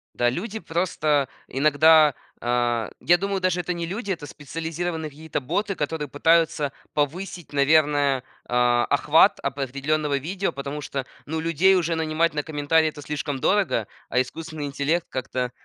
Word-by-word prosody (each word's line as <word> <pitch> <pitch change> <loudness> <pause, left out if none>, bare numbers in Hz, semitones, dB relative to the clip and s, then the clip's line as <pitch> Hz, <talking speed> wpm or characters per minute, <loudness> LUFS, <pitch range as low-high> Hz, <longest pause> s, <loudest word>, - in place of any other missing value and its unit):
Да, 120 0 +2
люди 205 - -4
просто 155 -6 0 0.2
иногда, 155 +2 +5 0.3
а 120 -2 0
Я 175 +1 +4
думаю, 195 0 -1
даже 180 -1 +1
это 180 - -4
не 170 -1 -3
люди, 200 +3 -4
это 165 -5 -4
специализированные 160 +2 -4
какие-то 155 +2 -4
боты, 195 +9 -1
которые 150 -1 -3
пытаются 155 0 +2 0.2
повысить, 170 +3 -3
наверное, 145 -2 +3 0.2
а, 120 0 +3
охват - - +4
определенного 140 +2 -1
видео, 185 +7 -2
потому 140 +2 -5
что, 135 -1 -4 0.2
ну 160 +2 -2
людей 165 +4 +3
уже 170 -2 +1
нанимать 160 0 +1
на 150 - -1
комментарии 155 +1 +2
это 150 -1 -10
слишком 145 -1 -3
дорого, 185 - +1 0.2
а 125 - +2
искусственный 155 +3 -6
интеллект 145 +4 -1
как-то 125 -1 -3
155 Hz, 145 wpm, -24 LUFS, 140-170 Hz, 0.3 s, иногда